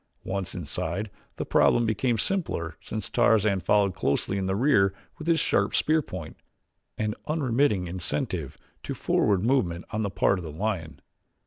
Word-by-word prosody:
Once 95 -1 -3
inside, 90 +5 -3 0.2
the - - -4
problem 120 - +4
became 115 +2 +1
simpler 100 - -2
since 110 -2 -5
Tarzan 110 -4 +3
followed 100 +1 +2
closely 95 +4 0
in 95 - -1
the 95 - 0
rear 100 -6 +3 0.2
with 155 - -7
his 165 -1 +4
sharp - - +1
spear 155 +1 +3
point, 90 - -8 0.6
an 110 -1 -1
unremitting 135 - +1
incentive 85 -4 -3 0.2
to - - -5
forward 100 -3 +2
movement 110 -9 +1
on 110 - -1
the 100 - 0
part 95 +1 +2
of - - -7
the 80 - -6
lion. 80 -5 -3
100 Hz, 155 wpm, -27 LUFS, 90-120 Hz, 0.6 s, problem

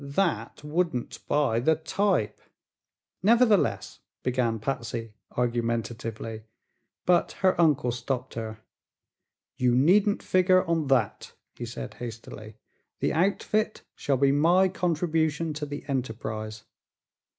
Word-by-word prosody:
That 150 +2 -1
wouldn't 150 -4 -2
buy 140 -6 +2
the 160 +6 +3
type." 160 - 0 0.8
"Nevertheless," 225 0 +3 0.2
began 125 -3 0
Patsy, 115 -1 -4 0.2
argumentatively, 115 -2 -2 0.6
but 175 -1 +3
her 185 -2 +4
uncle 145 -6 +3
stopped 125 +1 -3
her. 110 -1 -6 1.0
"You 125 -1 +3
needn't 195 +10 +4
figure 185 0 +4
on 165 -3 0
that," 125 -7 0 0.2
he 120 - -6
said 120 - -7
hastily. 110 -2 -8 0.4
"The - - 0
outfit 205 +5 0
shall 140 -2 0
be 135 +1 +4
my 175 +6 +4
contribution 165 -3 0
to 150 0 -4
the 145 0 -6
enterprise. 110 -5 -4
140 Hz, 105 wpm, -27 LUFS, 115-170 Hz, 1.0 s, her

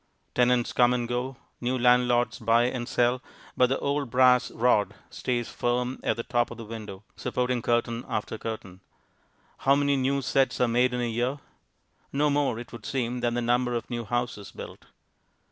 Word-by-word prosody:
Tenants 125 -1 +2
come 125 0 +4
and 120 -1 -2
go, 125 +2 -3 0.2
new 125 +1 0
landlords 125 0 +3
buy 115 +1 +3
and 125 0 -2
sell, 125 +1 +2 0.3
but 125 - +4
the 135 - 0
old 140 -2 -1
brass 125 0 +4
rod 110 -3 +2 0.2
stays 120 -2 -2
firm 125 +1 -1
at - - 0
the 115 - -3
top 120 0 0
of 120 - -9
the 115 - -8
window, 105 -3 -8
supporting 125 -1 -1
curtain 120 0 0
after 110 +1 -3
curtain. 100 -5 -6 0.8
How 135 +1 +4
many 140 0 +2
new 135 +1 0
sets 135 -1 +1
are 125 - +3
made 125 +2 +2
in 125 - -1
a - - 0
year? 120 +4 -1 0.7
No 145 +1 +2
more, 140 -5 +1
it 120 0 -8
would 120 - -9
seem, 125 -2 -2
than 120 -1 0
the 120 - 0
number 120 +1 +1
of 120 - -4
new 120 -1 -2
houses 120 -3 -3
built. - - -10
120 Hz, 180 wpm, -27 LUFS, 120-125 Hz, 0.8 s, come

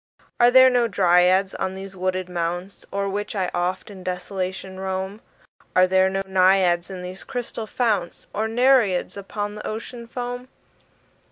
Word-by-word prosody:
Are 240 - +7
there 260 +1 +7
no 245 -1 +3
Dryads 185 0 +3
on 190 0 -3
these 195 0 -8
wooded 185 0 -2
mounts 175 +2 -4
O'er 200 0 -1
which 205 +2 -3
I 185 -2 -1
oft 180 +3 -2
in 190 -2 -11
desolation 185 +1 -4
roam? 190 +2 -4 0.5
Are 185 - +6
there 190 +1 +3
no 195 0 -2
Naiads 185 -2 +3
in 185 -2 -7
these 185 +1 -6
crystal 235 -3 -5
founts? 210 -8 -1
Nor 215 +2 -1
Nereids 235 -5 +3
upon 205 +1 -4
the 210 - -7
Ocean 230 +2 -6
foam? 245 +1 -5
190 Hz, 155 wpm, -23 LUFS, 185-220 Hz, 0.5 s, Are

